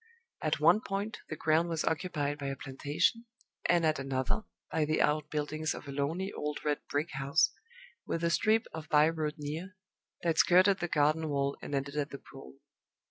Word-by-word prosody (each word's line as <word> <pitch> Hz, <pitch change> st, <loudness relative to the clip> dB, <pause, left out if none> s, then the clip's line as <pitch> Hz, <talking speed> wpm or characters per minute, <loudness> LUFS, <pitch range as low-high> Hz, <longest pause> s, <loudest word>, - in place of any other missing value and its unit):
At 155 Hz, -2 st, 0 dB
one 170 Hz, +8 st, +5 dB
point 200 Hz, +2 st, -3 dB
the 155 Hz, -, -3 dB
ground 160 Hz, +2 st, +2 dB
was 165 Hz, -2 st, -1 dB
occupied 150 Hz, -3 st, -1 dB
by 140 Hz, -, -3 dB
a 135 Hz, -, -2 dB
plantation, 145 Hz, -, -1 dB, 0.4 s
and 175 Hz, -2 st, +4 dB
at 155 Hz, -2 st, +2 dB
another 135 Hz, -, -1 dB, 0.3 s
by 160 Hz, -, +1 dB
the 155 Hz, +1 st, +1 dB
out 150 Hz, 0 st, +2 dB
buildings 155 Hz, +1 st, -2 dB
of -, -, -9 dB
a -, -, -5 dB
lonely 160 Hz, +8 st, -2 dB
old 150 Hz, 0 st, -4 dB
red 150 Hz, -1 st, +1 dB
brick 150 Hz, +4 st, -1 dB
house, 150 Hz, +5 st, +2 dB, 0.6 s
with 165 Hz, -, -2 dB
a 170 Hz, -, +2 dB
strip 220 Hz, +5 st, +3 dB
of 160 Hz, -2 st, -7 dB
by 150 Hz, +1 st, +6 dB
road 155 Hz, -2 st, -2 dB
near, 160 Hz, +6 st, -6 dB, 0.5 s
that 165 Hz, -2 st, +1 dB
skirted 185 Hz, +2 st, +5 dB
the 175 Hz, -, -1 dB
garden 155 Hz, 0 st, +2 dB
wall 140 Hz, -1 st, 0 dB
and 145 Hz, -, -4 dB
ended 140 Hz, +2 st, -3 dB
at 145 Hz, 0 st, 0 dB
the 140 Hz, -, -7 dB
pool. 65 Hz, -, -13 dB
155 Hz, 190 wpm, -31 LUFS, 145-170 Hz, 0.6 s, by